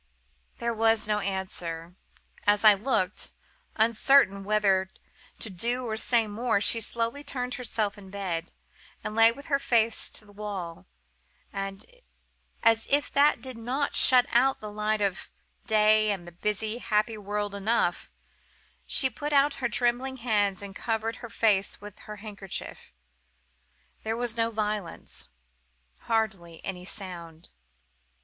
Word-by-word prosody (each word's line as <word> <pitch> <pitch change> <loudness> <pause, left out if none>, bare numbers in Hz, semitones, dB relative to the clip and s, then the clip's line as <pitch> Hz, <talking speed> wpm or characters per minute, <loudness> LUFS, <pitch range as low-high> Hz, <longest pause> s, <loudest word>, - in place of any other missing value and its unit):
"There 235 0 -2
was 225 0 +2
no 210 -1 +1
answer. 180 -4 -4 0.5
As 205 +1 +4
I 215 -1 +9
looked, 205 -3 -1 0.4
uncertain 220 -2 +4
whether 195 -2 +2 0.5
to 225 - -3
do 240 +7 -1
or 220 -2 -2
say 230 +1 +2
more, 215 +1 0
she 230 +3 +5
slowly 230 +5 -1
turned 250 -3 -4
herself 220 -4 -2
in 195 -1 -13
bed, 180 -4 -4 0.5
and 215 - -4
lay 225 0 +6
with 280 +4 -12
her 280 -3 +1
face 230 -4 +2
to 215 - -9
the 205 - -17
wall; 200 -5 -7 0.7
and, 195 0 -5 0.8
as 225 -1 +4
if 285 +1 +1
that 285 -3 +3
did 260 -3 -7
not 260 +5 -2
shut 250 -1 +8
out 265 +3 +3
the 210 -1 -7
light 210 0 -1
of 195 -2 -2 0.4
day 215 -1 +4
and 190 -4 -3
the - - -9
busy, 210 +5 -2
happy 215 0 0
world 205 0 -4
enough, 210 +4 0 0.8
she 265 - +6
put 290 +4 -5
out 280 +1 +4
her 240 - 0
trembling 245 +4 0
hands, 205 -5 0
and 195 -1 -9
covered 225 0 -2
her 240 - -9
face 200 -2 +1
with 205 0 -11
her 210 - -9
handkerchief. 205 -3 -5 1.1
There 225 +1 -3
was 240 -1 -1
no 230 0 +1
violence: 210 - -4 0.7
hardly 195 -7 -2
any 180 -2 -5
sound. 175 -5 -7
215 Hz, 140 wpm, -27 LUFS, 200-235 Hz, 1.1 s, I